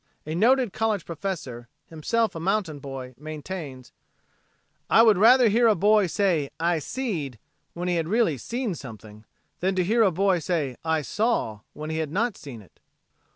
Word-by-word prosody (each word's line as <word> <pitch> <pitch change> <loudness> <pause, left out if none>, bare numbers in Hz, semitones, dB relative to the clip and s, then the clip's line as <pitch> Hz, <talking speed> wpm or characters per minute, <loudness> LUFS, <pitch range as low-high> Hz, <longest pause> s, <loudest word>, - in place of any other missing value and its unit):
A 155 - -4
noted 235 +4 +3
college 215 -4 -1
professor, 160 -9 -5 0.2
himself 215 +8 -1
a 165 - -6
mountain 180 -4 -1
boy, 135 -2 -8
maintains: 150 -4 -7 1.0
"I 225 - +6
would 220 -3 +6
rather 245 +3 +7
hear 230 +3 +4
a 220 - +4
boy 205 +1 +4
say 170 -6 0
'I 170 0 +1
seed' 160 - -4 0.4
when 175 +1 -4
he 175 -1 +1
had 165 -1 -1
really 190 - +1
seen 235 - -3
something, 110 -7 -11 0.3
than 190 +1 0
to 185 - +2
hear 225 +6 +2
a 210 - +5
boy 185 +1 +1
say 150 -6 -2
'I 160 -2 0
saw' 210 - -1
when 155 +1 -6
he 160 - -2
had 155 -2 -2
not 220 +4 0
seen 120 -7 -10
it." 95 - -25
175 Hz, 170 wpm, -25 LUFS, 145-215 Hz, 1.0 s, rather